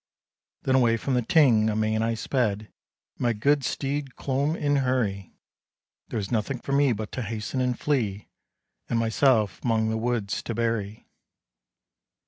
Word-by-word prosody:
Then 130 Hz, -, +1 dB
away 120 Hz, -3 st, +4 dB
from 135 Hz, +4 st, -2 dB
the 125 Hz, -, +2 dB
Ting 115 Hz, -4 st, +4 dB
amain 110 Hz, 0 st, 0 dB
I 115 Hz, 0 st, 0 dB
sped, 110 Hz, -3 st, 0 dB
And 110 Hz, -, -24 dB
my 120 Hz, -1 st, +2 dB
good 140 Hz, +6 st, +2 dB
steed 140 Hz, 0 st, -3 dB
clomb 140 Hz, +3 st, -1 dB
in 145 Hz, -3 st, +1 dB
hurry; 120 Hz, -8 st, -1 dB, 0.7 s
There -, -, -4 dB
was 100 Hz, 0 st, -3 dB
nothing 115 Hz, +3 st, -1 dB
for 130 Hz, -, -7 dB
me 140 Hz, -1 st, +4 dB
but 110 Hz, -2 st, -4 dB
to 130 Hz, -, -4 dB
hasten 115 Hz, +3 st, -3 dB
and 125 Hz, -1 st, 0 dB
flee, 110 Hz, -9 st, -1 dB, 0.6 s
And 120 Hz, -, +1 dB
myself 115 Hz, -2 st, +2 dB
'mong 110 Hz, -2 st, +1 dB
the 110 Hz, -, -1 dB
woods 115 Hz, -3 st, -1 dB
to 115 Hz, -, -5 dB
bury. 115 Hz, -2 st, -2 dB
115 Hz, 155 wpm, -26 LUFS, 110-130 Hz, 0.7 s, away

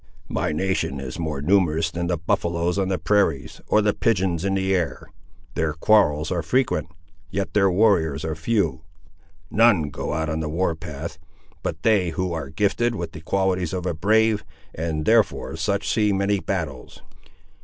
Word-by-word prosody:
"My -, -, -1 dB
nation 85 Hz, -4 st, -1 dB
is 65 Hz, +3 st, -6 dB
more 75 Hz, -4 st, -3 dB
numerous 80 Hz, -3 st, +2 dB
than 85 Hz, +1 st, -3 dB
the 90 Hz, -1 st, 0 dB
buffaloes 85 Hz, +3 st, 0 dB
on 95 Hz, -, +1 dB
the 95 Hz, -1 st, 0 dB
prairies, 85 Hz, -5 st, 0 dB
or 105 Hz, -, +3 dB
the 105 Hz, -1 st, +2 dB
pigeons 95 Hz, -6 st, 0 dB
in 95 Hz, 0 st, 0 dB
the 95 Hz, 0 st, +1 dB
air. 80 Hz, -4 st, -1 dB, 0.5 s
Their 80 Hz, -2 st, 0 dB
quarrels 80 Hz, -3 st, +3 dB
are 90 Hz, -2 st, 0 dB
frequent; 130 Hz, -, 0 dB, 0.4 s
yet 100 Hz, +2 st, -3 dB
their 100 Hz, -2 st, +4 dB
warriors 90 Hz, -7 st, +2 dB
are 80 Hz, -, -2 dB
few. 85 Hz, 0 st, 0 dB, 0.7 s
None 105 Hz, -10 st, +4 dB
go -, -, -4 dB
out 80 Hz, +1 st, -1 dB
on 80 Hz, +1 st, -2 dB
the 80 Hz, -1 st, -3 dB
war 85 Hz, +2 st, 0 dB
path 80 Hz, 0 st, -7 dB, 0.4 s
but 80 Hz, -, -4 dB
they 105 Hz, -6 st, +3 dB
who 90 Hz, +2 st, -2 dB
are 80 Hz, -5 st, -4 dB
gifted 105 Hz, -, 0 dB
with 85 Hz, -5 st, -4 dB
the 80 Hz, -, -10 dB
qualities 95 Hz, 0 st, 0 dB
of 90 Hz, -1 st, -3 dB
a 90 Hz, -, 0 dB
brave, 110 Hz, +5 st, +2 dB, 0.3 s
and 80 Hz, -1 st, -3 dB
therefore 110 Hz, -7 st, +2 dB
such 100 Hz, +5 st, -1 dB
see 105 Hz, -2 st, +2 dB
many 100 Hz, +1 st, +1 dB
battles." 80 Hz, -11 st, -5 dB
90 Hz, 170 wpm, -23 LUFS, 80-100 Hz, 0.7 s, their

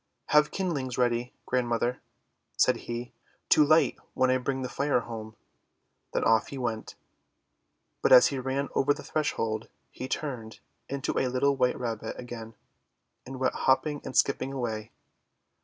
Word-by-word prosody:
"Have 150 Hz, 0 st, +5 dB
kindlings 145 Hz, -10 st, -2 dB
ready, 120 Hz, 0 st, +1 dB
Grandmother," 120 Hz, 0 st, 0 dB, 0.6 s
said -, -, +4 dB
he, 120 Hz, +1 st, -4 dB, 0.4 s
"to 150 Hz, -, +7 dB
light 155 Hz, +2 st, +4 dB, 0.2 s
when 130 Hz, 0 st, +3 dB
I 130 Hz, -, +2 dB
bring 130 Hz, +1 st, -2 dB
the -, -, -2 dB
Fire 140 Hz, 0 st, +1 dB
home." 110 Hz, -2 st, -8 dB, 0.8 s
Then -, -, 0 dB
off 115 Hz, -1 st, +4 dB
he 140 Hz, -, -7 dB
went. 115 Hz, -4 st, -3 dB, 1.1 s
But -, -, +2 dB
as 125 Hz, -1 st, +9 dB
he 140 Hz, -, -3 dB
ran 135 Hz, +2 st, -2 dB
over 145 Hz, +1 st, +3 dB
the 145 Hz, -, -9 dB
threshold 115 Hz, -8 st, -2 dB, 0.2 s
he 130 Hz, -, -6 dB
turned 125 Hz, -7 st, -4 dB, 0.3 s
into 140 Hz, -1 st, -1 dB
a 130 Hz, -, +1 dB
little 135 Hz, +3 st, +2 dB
white 125 Hz, -2 st, +1 dB
Rabbit 115 Hz, -3 st, -3 dB
again, 115 Hz, -2 st, -8 dB, 0.7 s
and 130 Hz, 0 st, -7 dB
went 130 Hz, -, +1 dB
hopping 145 Hz, +2 st, +1 dB
and -, -, -4 dB
skipping 135 Hz, -1 st, +2 dB
away. 115 Hz, -5 st, -4 dB
130 Hz, 150 wpm, -28 LUFS, 120-140 Hz, 1.1 s, as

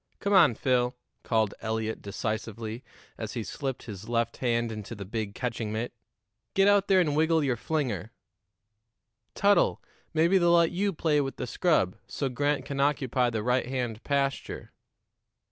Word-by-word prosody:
"Come 200 Hz, -, 0 dB
on, 190 Hz, -, +6 dB
Phil," 125 Hz, 0 st, +1 dB, 0.3 s
called 110 Hz, -3 st, +1 dB
Eliot 110 Hz, 0 st, -2 dB
decisively, 110 Hz, +2 st, -4 dB, 0.4 s
as 110 Hz, -1 st, -4 dB
he 120 Hz, -3 st, -3 dB
slipped 135 Hz, +2 st, -4 dB
his 105 Hz, 0 st, -8 dB
left 115 Hz, -1 st, 0 dB
hand 120 Hz, -2 st, 0 dB
into 110 Hz, +1 st, -6 dB
the 100 Hz, -2 st, -7 dB
big 105 Hz, 0 st, -4 dB
catching 115 Hz, -4 st, -3 dB
mitt, 110 Hz, +3 st, -3 dB, 0.6 s
"get 195 Hz, 0 st, +5 dB
out 205 Hz, -1 st, +4 dB
there 190 Hz, -1 st, +5 dB
and 150 Hz, -5 st, +2 dB
wiggle 160 Hz, 0 st, +3 dB
your 130 Hz, -3 st, +1 dB
flinger. 120 Hz, -, -2 dB, 1.2 s
Tuttle, 200 Hz, 0 st, +3 dB, 0.3 s
maybe 170 Hz, +4 st, +4 dB
they'll 175 Hz, -1 st, +4 dB
let 170 Hz, -1 st, +4 dB
you 200 Hz, +3 st, 0 dB
play 155 Hz, -3 st, +1 dB
with 135 Hz, -1 st, -3 dB
the -, -, -4 dB
scrub, 120 Hz, -, +1 dB
so 140 Hz, -, -2 dB
Grant 145 Hz, +1 st, 0 dB
can 140 Hz, +1 st, -4 dB
occupy 135 Hz, -3 st, +2 dB
the 110 Hz, -2 st, -2 dB
right 125 Hz, +1 st, +1 dB
hand 125 Hz, -3 st, -3 dB
pasture." 140 Hz, -1 st, -2 dB
125 Hz, 160 wpm, -28 LUFS, 110-150 Hz, 1.2 s, on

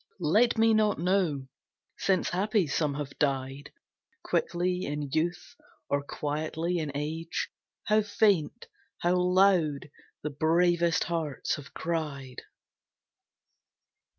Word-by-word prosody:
Let 210 Hz, +10 st, +3 dB
me 225 Hz, 0 st, +5 dB
not 215 Hz, -2 st, +3 dB
know, 170 Hz, -6 st, +1 dB, 0.5 s
since 190 Hz, -1 st, +1 dB
happy 205 Hz, +2 st, +1 dB
some 145 Hz, 0 st, 0 dB
have 145 Hz, -1 st, -6 dB
died 135 Hz, 0 st, -1 dB, 0.5 s
Quickly 180 Hz, +1 st, 0 dB
in 145 Hz, -1 st, -4 dB
youth 170 Hz, -, -1 dB, 0.4 s
or 140 Hz, 0 st, +1 dB
quietly 155 Hz, +4 st, -2 dB
in 155 Hz, -3 st, -3 dB
age, 160 Hz, +3 st, -3 dB, 0.3 s
How 215 Hz, 0 st, +3 dB
faint, 205 Hz, -6 st, +1 dB, 0.4 s
how 175 Hz, +1 st, +3 dB
loud 180 Hz, -6 st, +3 dB, 0.3 s
the 150 Hz, -, -2 dB
bravest 170 Hz, +3 st, +2 dB
hearts 165 Hz, -5 st, -2 dB
have 145 Hz, -, -12 dB
cried. 150 Hz, -6 st, -4 dB
165 Hz, 105 wpm, -28 LUFS, 145-180 Hz, 0.5 s, me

